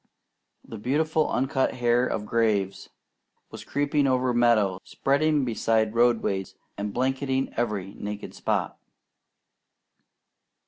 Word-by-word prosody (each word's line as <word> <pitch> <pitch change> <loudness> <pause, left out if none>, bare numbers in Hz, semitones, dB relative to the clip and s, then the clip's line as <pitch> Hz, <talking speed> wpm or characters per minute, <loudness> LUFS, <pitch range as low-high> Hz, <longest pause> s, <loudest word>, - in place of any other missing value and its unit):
"The 110 - -9
beautiful 155 +6 +1
uncut 135 +1 0
hair 120 0 +2
of 105 - -3
graves" 105 -4 0 0.6
was - - -9
creeping 145 0 0
over 130 -1 +1
meadow, 110 -6 +3
spreading 145 +1 +1
beside 110 -2 +1
roadways, 115 -5 +1 0.2
and 105 0 -4
blanketing 130 +2 -1
every 105 -5 -2
naked 105 0 -6
spot. - - -2
120 Hz, 100 wpm, -26 LUFS, 105-135 Hz, 0.6 s, meadow